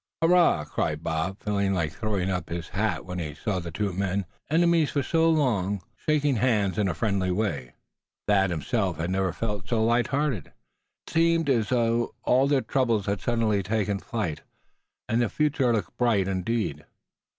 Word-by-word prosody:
"Hurrah!" 170 Hz, -, +4 dB
cried 75 Hz, +1 st, -2 dB
Bob, 80 Hz, +4 st, -2 dB
feeling 100 Hz, -2 st, 0 dB
like 80 Hz, -4 st, -1 dB
throwing 100 Hz, -4 st, -1 dB
up 90 Hz, -3 st, -3 dB
his 85 Hz, 0 st, -5 dB
hat 105 Hz, +1 st, -1 dB
when 90 Hz, -1 st, -5 dB
he 75 Hz, -4 st, -5 dB
saw 100 Hz, -1 st, -2 dB
the 85 Hz, -1 st, -6 dB
two 100 Hz, +3 st, -2 dB
men, 100 Hz, +1 st, -1 dB, 0.2 s
enemies 165 Hz, -1 st, +3 dB
for 140 Hz, -, -1 dB
so 165 Hz, +2 st, +2 dB
long, 105 Hz, -, +1 dB
shaking 150 Hz, -4 st, +1 dB
hands 105 Hz, -5 st, +1 dB
in 105 Hz, -, +2 dB
a 90 Hz, -, -1 dB
friendly 100 Hz, -4 st, 0 dB
way. 90 Hz, -, -2 dB, 0.5 s
Thad 95 Hz, -2 st, +3 dB
himself 90 Hz, -, -1 dB
had 85 Hz, +3 st, -2 dB
never 95 Hz, -1 st, +1 dB
felt 105 Hz, -3 st, -4 dB
so 115 Hz, -2 st, +1 dB
light 120 Hz, +2 st, +2 dB
hearted. 135 Hz, -, -1 dB, 0.6 s
It -, -, -11 dB
seemed 165 Hz, -2 st, +3 dB
as 115 Hz, -5 st, +1 dB
though 120 Hz, -1 st, +1 dB
all 130 Hz, +2 st, +4 dB
of -, -, 0 dB
their 140 Hz, -2 st, +3 dB
troubles 115 Hz, -8 st, 0 dB
had 100 Hz, -1 st, -1 dB
suddenly 115 Hz, -4 st, +1 dB
taken 100 Hz, 0 st, -1 dB
flight, 100 Hz, -9 st, -3 dB, 0.7 s
and 115 Hz, +2 st, +1 dB
the 120 Hz, -, +1 dB
future 150 Hz, -4 st, +1 dB
looked 110 Hz, -4 st, -2 dB
bright 110 Hz, -6 st, +2 dB
indeed. 95 Hz, -5 st, -2 dB
105 Hz, 175 wpm, -26 LUFS, 95-125 Hz, 0.7 s, Hurrah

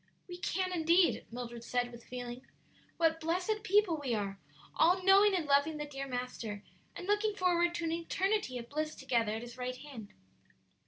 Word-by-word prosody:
"We 355 Hz, -1 st, -7 dB
can 370 Hz, +1 st, -1 dB
indeed," 340 Hz, +1 st, +3 dB
Mildred 240 Hz, -1 st, -6 dB
said, 245 Hz, 0 st, -1 dB
with 235 Hz, -1 st, -11 dB
feeling. 245 Hz, 0 st, -6 dB, 0.6 s
"What 325 Hz, -1 st, +3 dB
blessed 360 Hz, +6 st, -1 dB
people 410 Hz, -5 st, +3 dB
we 245 Hz, -4 st, 0 dB
are! 195 Hz, -2 st, -3 dB, 0.4 s
all 355 Hz, +4 st, +4 dB
knowing 390 Hz, +1 st, +6 dB
and 345 Hz, -4 st, 0 dB
loving 285 Hz, +2 st, +3 dB
the 295 Hz, -, -3 dB
dear 275 Hz, -1 st, -6 dB
Master, 245 Hz, -5 st, -4 dB, 0.3 s
and -, -, -6 dB
looking 415 Hz, +1 st, +1 dB
forward 345 Hz, -2 st, +2 dB
to 345 Hz, -, -3 dB
an 325 Hz, -, 0 dB
eternity 340 Hz, -2 st, 0 dB
of 235 Hz, -1 st, -7 dB
bliss 310 Hz, +3 st, -3 dB
together 235 Hz, -5 st, 0 dB
at 225 Hz, -, -5 dB
His 240 Hz, +1 st, -10 dB
right 250 Hz, 0 st, -3 dB
hand." 260 Hz, -8 st, -9 dB
310 Hz, 175 wpm, -33 LUFS, 245-360 Hz, 0.6 s, knowing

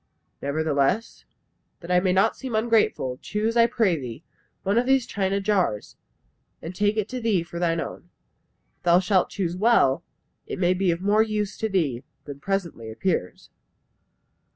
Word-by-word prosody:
Nevertheless, 150 Hz, +7 st, 0 dB, 0.6 s
that 170 Hz, +1 st, -6 dB
I 180 Hz, -, +5 dB
may 185 Hz, 0 st, +1 dB
not 195 Hz, +4 st, +3 dB
seem 260 Hz, -4 st, -5 dB
ungrateful, 220 Hz, -, +1 dB
choose, 215 Hz, +2 st, -2 dB
I 235 Hz, 0 st, +6 dB
pray 225 Hz, -7 st, +2 dB
thee, 125 Hz, +3 st, -8 dB, 0.4 s
one 200 Hz, +4 st, +2 dB
of 250 Hz, -, -1 dB
these 265 Hz, -2 st, +3 dB
china 195 Hz, 0 st, -1 dB
jars; 195 Hz, -, 0 dB, 0.6 s
and 165 Hz, -, -7 dB
take 205 Hz, +3 st, +1 dB
it 215 Hz, -2 st, 0 dB
to 255 Hz, -1 st, -4 dB
thee 210 Hz, -7 st, +1 dB
for 170 Hz, 0 st, -8 dB
thine 165 Hz, -1 st, +1 dB
own. 175 Hz, -, -7 dB, 0.7 s
If -, -, -45 dB
thou 175 Hz, 0 st, +5 dB
shalt 185 Hz, 0 st, +2 dB
choose 180 Hz, -4 st, -2 dB
well, 195 Hz, -, +3 dB, 0.4 s
it -, -, -5 dB
may 180 Hz, -1 st, +2 dB
be 185 Hz, 0 st, 0 dB
of 170 Hz, +1 st, 0 dB
more 205 Hz, +2 st, +3 dB
use 210 Hz, -2 st, -1 dB
to 220 Hz, -, -1 dB
thee 145 Hz, -, 0 dB, 0.2 s
than 140 Hz, -1 st, -8 dB
presently 170 Hz, -, -3 dB
appears." 110 Hz, -, -3 dB
190 Hz, 165 wpm, -24 LUFS, 165-215 Hz, 0.7 s, I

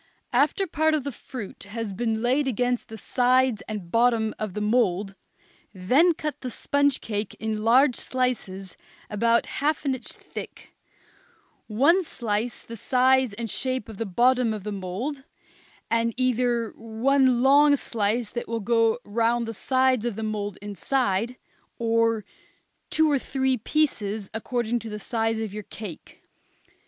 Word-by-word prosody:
After 290 Hz, +9 st, +3 dB
part 315 Hz, -2 st, +1 dB
of 300 Hz, -, -1 dB
the 280 Hz, -, -3 dB
fruit 215 Hz, -4 st, -9 dB
is 225 Hz, -3 st, -3 dB
laid 240 Hz, +4 st, +1 dB
against 245 Hz, 0 st, -1 dB
the 220 Hz, -, -8 dB
sides 255 Hz, -1 st, +2 dB
and 205 Hz, -6 st, -6 dB
bottom 230 Hz, -2 st, +3 dB
of 215 Hz, -4 st, -4 dB
the -, -, -2 dB
mould, 210 Hz, -3 st, +1 dB, 0.6 s
then 270 Hz, -, +4 dB
cut 300 Hz, -1 st, -4 dB
the 255 Hz, -, -4 dB
sponge 285 Hz, +3 st, +1 dB
cake 210 Hz, -2 st, -3 dB
in 220 Hz, -1 st, -3 dB
large 250 Hz, +3 st, +5 dB
slices 210 Hz, -7 st, -2 dB, 0.4 s
about 230 Hz, +3 st, +2 dB
half 300 Hz, +1 st, -1 dB
an 275 Hz, -, +2 dB
inch 255 Hz, -3 st, -6 dB
thick, -, -, -8 dB, 0.9 s
one 285 Hz, -, +4 dB
slice 235 Hz, -5 st, -3 dB
the 230 Hz, -, -8 dB
size 255 Hz, +1 st, +3 dB
and 230 Hz, +2 st, -4 dB
shape 255 Hz, +2 st, -2 dB
of 220 Hz, -3 st, -10 dB
the 225 Hz, -, -3 dB
bottom 240 Hz, +3 st, +3 dB
of 205 Hz, -, -7 dB
the 210 Hz, -, -4 dB
mould, 205 Hz, +9 st, -4 dB, 0.7 s
and 230 Hz, 0 st, +1 dB
either 245 Hz, -2 st, +1 dB
one 245 Hz, +3 st, +2 dB
long 285 Hz, +2 st, +6 dB
slice 225 Hz, -3 st, -1 dB
that 240 Hz, -, -4 dB
will 230 Hz, 0 st, -2 dB
go 225 Hz, +1 st, +2 dB
round 230 Hz, +2 st, +1 dB
the 225 Hz, -, -4 dB
sides 260 Hz, +1 st, +2 dB
of 240 Hz, -3 st, -2 dB
the 220 Hz, -, -4 dB
mould 205 Hz, -2 st, -3 dB
inside; 225 Hz, +2 st, -1 dB, 0.4 s
or 230 Hz, -1 st, +1 dB, 0.6 s
two 315 Hz, -1 st, +3 dB
or 280 Hz, -, +3 dB
three 265 Hz, 0 st, 0 dB
pieces, 220 Hz, -6 st, -1 dB
according 240 Hz, +1 st, -1 dB
to 225 Hz, 0 st, -7 dB
the 210 Hz, -, -5 dB
size 225 Hz, +1 st, -1 dB
of 220 Hz, -3 st, -4 dB
your 210 Hz, -, -5 dB
cake. 205 Hz, -3 st, -10 dB
230 Hz, 150 wpm, -25 LUFS, 215-260 Hz, 0.9 s, long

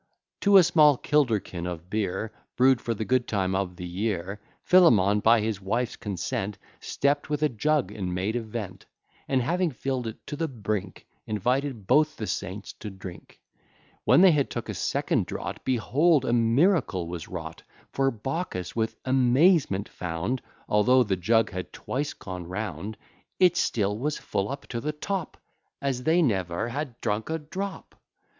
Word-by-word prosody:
To 200 Hz, -1 st, +6 dB
a 185 Hz, -, +9 dB
small 155 Hz, -5 st, +5 dB
kilderkin 110 Hz, -, 0 dB
of 85 Hz, -1 st, -6 dB
beer, 110 Hz, +1 st, -2 dB, 0.2 s
Brew'd 130 Hz, -1 st, +4 dB
for 115 Hz, -, -2 dB
the 110 Hz, -, -3 dB
good 125 Hz, 0 st, +1 dB
time 95 Hz, -3 st, 0 dB
of 95 Hz, -2 st, -1 dB
the 90 Hz, -, -7 dB
year, 100 Hz, +1 st, -3 dB, 0.2 s
Philemon, 105 Hz, -, +5 dB
by 115 Hz, +1 st, +5 dB
his 105 Hz, -2 st, -2 dB
wife's 115 Hz, +5 st, -1 dB
consent, 100 Hz, 0 st, -3 dB, 0.2 s
Stept 145 Hz, +2 st, 0 dB
with 150 Hz, 0 st, -1 dB
a 150 Hz, -, +4 dB
jug, 150 Hz, +4 st, 0 dB
and 95 Hz, -3 st, -4 dB
made 95 Hz, +5 st, -1 dB
a 120 Hz, -, 0 dB
vent, 110 Hz, -4 st, -7 dB, 0.4 s
And 130 Hz, -2 st, +1 dB
having 175 Hz, +7 st, +1 dB
fill'd 130 Hz, -3 st, -3 dB
it 110 Hz, -, -6 dB
to 145 Hz, -, -5 dB
the 165 Hz, +2 st, -1 dB
brink, 105 Hz, -7 st, -4 dB, 0.2 s
Invited 125 Hz, +2 st, -1 dB
both 150 Hz, +9 st, +3 dB
the 110 Hz, -, -3 dB
saints 100 Hz, 0 st, -5 dB
to 105 Hz, -, -6 dB
drink. 95 Hz, -2 st, -11 dB, 0.6 s
When -, -, +5 dB
they 190 Hz, -1 st, +8 dB
had 145 Hz, -3 st, +1 dB
took -, -, -5 dB
a -, -, -2 dB
second -, -, 0 dB
draught, -, -, -5 dB
Behold, 135 Hz, +4 st, +2 dB
a 120 Hz, -, +1 dB
miracle 120 Hz, -, +2 dB
was 85 Hz, -2 st, -6 dB
wrought; -, -, -7 dB, 0.3 s
For, 135 Hz, 0 st, +2 dB
Baucis 135 Hz, -, -4 dB
with 110 Hz, -1 st, -1 dB
amazement 130 Hz, -, +3 dB
found, 90 Hz, +9 st, -3 dB, 0.3 s
Although 125 Hz, +5 st, +4 dB
the 100 Hz, -4 st, 0 dB
jug 110 Hz, +5 st, +2 dB
had 90 Hz, -1 st, -5 dB
twice 145 Hz, +3 st, -3 dB
gone 90 Hz, -3 st, -7 dB
round, 105 Hz, +2 st, -5 dB, 0.4 s
It 180 Hz, -2 st, +5 dB
still 105 Hz, -, +1 dB
was 150 Hz, +4 st, -1 dB
full 100 Hz, 0 st, -2 dB
up 140 Hz, +1 st, -6 dB
to 120 Hz, -2 st, -3 dB
the 150 Hz, +3 st, -2 dB
top, 185 Hz, +2 st, -4 dB, 0.4 s
As 135 Hz, -3 st, -2 dB
they 170 Hz, +2 st, +4 dB
ne'er 95 Hz, -, 0 dB
had 135 Hz, -1 st, -5 dB
drunk 105 Hz, +5 st, -1 dB
a 160 Hz, -, 0 dB
drop. 185 Hz, +6 st, -6 dB
115 Hz, 165 wpm, -26 LUFS, 100-145 Hz, 0.6 s, a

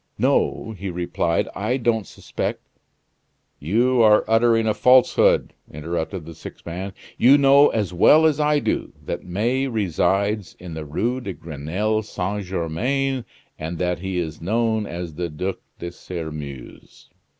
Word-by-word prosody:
"No," 110 Hz, -, +1 dB
he 100 Hz, -2 st, -6 dB
replied, 85 Hz, -1 st, -1 dB
"I 110 Hz, +6 st, -1 dB
don't 115 Hz, -5 st, 0 dB
suspect -, -, -5 dB, 0.5 s
" -, -, -47 dB
"You 120 Hz, +4 st, +3 dB
are 105 Hz, -1 st, +5 dB
uttering 115 Hz, 0 st, +3 dB
a 110 Hz, -, +2 dB
falsehood!" 125 Hz, +4 st, +4 dB, 0.2 s
interrupted 80 Hz, +3 st, -4 dB
the 85 Hz, -, -9 dB
sick -, -, -11 dB
man. 95 Hz, +3 st, -5 dB, 0.3 s
"You 135 Hz, +4 st, +7 dB
know 140 Hz, +1 st, +6 dB
as 105 Hz, -5 st, -2 dB
well 155 Hz, -, +6 dB
as 155 Hz, -2 st, +3 dB
I 150 Hz, 0 st, +3 dB
do, -, -, -2 dB
that -, -, -4 dB
May 120 Hz, +9 st, 0 dB
resides 100 Hz, -2 st, 0 dB
in 90 Hz, -2 st, -9 dB
the 80 Hz, -1 st, -6 dB
Rue 120 Hz, -, -1 dB
de 100 Hz, -6 st, -5 dB
Grenelle 85 Hz, +9 st, -2 dB
Saint 100 Hz, -1 st, -3 dB
Germain, 120 Hz, -, -1 dB, 0.3 s
and 80 Hz, +2 st, -4 dB
that 90 Hz, 0 st, -1 dB
he 95 Hz, 0 st, -3 dB
is 80 Hz, -3 st, -4 dB
known 110 Hz, +3 st, 0 dB
as 85 Hz, -2 st, -6 dB
the 85 Hz, +2 st, -3 dB
Duc 90 Hz, +6 st, -4 dB, 0.2 s
de 85 Hz, -, -6 dB
Sairmeuse." 75 Hz, -7 st, -8 dB
100 Hz, 150 wpm, -22 LUFS, 85-115 Hz, 0.5 s, You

